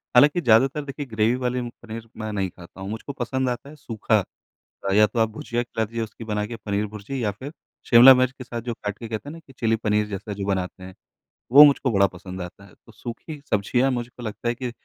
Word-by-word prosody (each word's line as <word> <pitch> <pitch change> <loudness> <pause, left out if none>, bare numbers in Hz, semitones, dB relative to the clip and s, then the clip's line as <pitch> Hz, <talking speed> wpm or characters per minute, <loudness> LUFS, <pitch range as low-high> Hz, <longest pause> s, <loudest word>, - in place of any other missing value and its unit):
हालाँकि 145 +7 +6
ज़्यादातर 135 +4 +4
देखिए 140 +1 -5
ग्रेवी 110 0 +1
वाली 125 0 0
पनीर 115 -1 -8
मैं 110 -1 -4
नहीं 95 -2 -1
खाता 90 +2 -14
हूँ, 95 - -5
मुझको 110 +6 -6
पसंद 130 0 -1
आता 125 +3 -5
है 150 - -12
सूखा। 115 -7 0 0.7
अ, 95 - +1
या 105 +1 +6
तो 115 - -3
आप 110 -1 +3
भुजिया 120 +2 -3
खिला 115 -2 -2
दीजिए 115 +1 -4
उसकी 110 +1 -9
बना 105 -1 -2
के 115 +2 -6
पनीर 105 -1 -2
भुर्जी 110 +5 -5
या 105 - +1
फिर 130 +8 -9 0.4
शिमला 125 +2 +10
मिर्च 130 0 +2
के 135 -1 -10
साथ 120 -2 -5
जो 120 0 -4
काट 105 -2 -5
के 115 - -7
कहते 110 +5 -5
हैं - - -8
ना 165 - -10
कि 135 - -15
चिली 115 -1 +2
पनीर 105 -1 +1
जैसा 105 +1 -5
जो 100 -1 -4
बनाते 95 -1 -2
हैं 95 0 -10 0.6
वो 140 +3 +11
मुझको 140 -2 +3
बड़ा 100 -2 +4
पसंद 95 0 -9
आता 90 +3 -9
है। 100 - -18
तो - - -15
सूखी 135 +6 -8
सब्ज़ियाँ 120 +6 +2
मुझको 120 0 -5
लगता 110 +1 -5
है 120 - -1
कि 125 -1 -4
115 Hz, 240 wpm, -24 LUFS, 105-125 Hz, 0.7 s, वो